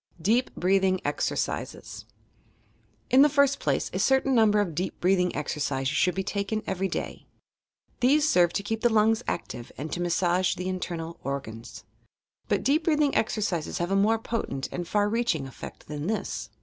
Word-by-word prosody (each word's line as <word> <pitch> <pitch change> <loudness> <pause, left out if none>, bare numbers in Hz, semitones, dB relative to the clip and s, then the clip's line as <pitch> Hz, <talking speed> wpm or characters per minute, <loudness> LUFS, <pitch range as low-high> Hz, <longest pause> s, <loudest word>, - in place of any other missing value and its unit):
DEEP 225 +10 +2
BREATHING 190 0 +2
EXERCISES - - -3 1.1
In 260 - +7
the 295 - +7
first 280 -1 +3
place, - - -1
a - - -2
certain 265 0 +3
number 220 -3 +4
of 205 -3 +1
decp 175 +4 -3
breathingr 180 0 +2
exercises 145 -2 -2
should 180 +4 +2
he 190 - 0
taken 200 +2 -2
every 190 +1 -1
day. - - -5 0.7
These 290 +5 +4
serve 175 - +4
to 200 - -2
keep 220 +2 -3
the 240 - +4
lungs 220 +1 +3
active 120 - -4
and 150 +3 -5
to 175 - -2
massage 175 +1 +1
the 185 - -4
internal 170 -2 -5
organs. 130 -5 -6 0.6
But - - 0
deep 305 +4 +2
breathing 300 -3 +2
exercises 205 -7 -1
have 175 +2 -2
a - - +2
more 210 +3 +3
potent 225 - -3
and 175 -1 -4
far 205 +2 +1
reaching 215 - 0
effect 135 - -10
than 150 +1 -5
this. 220 +1 -3
190 Hz, 165 wpm, -27 LUFS, 170-225 Hz, 1.1 s, In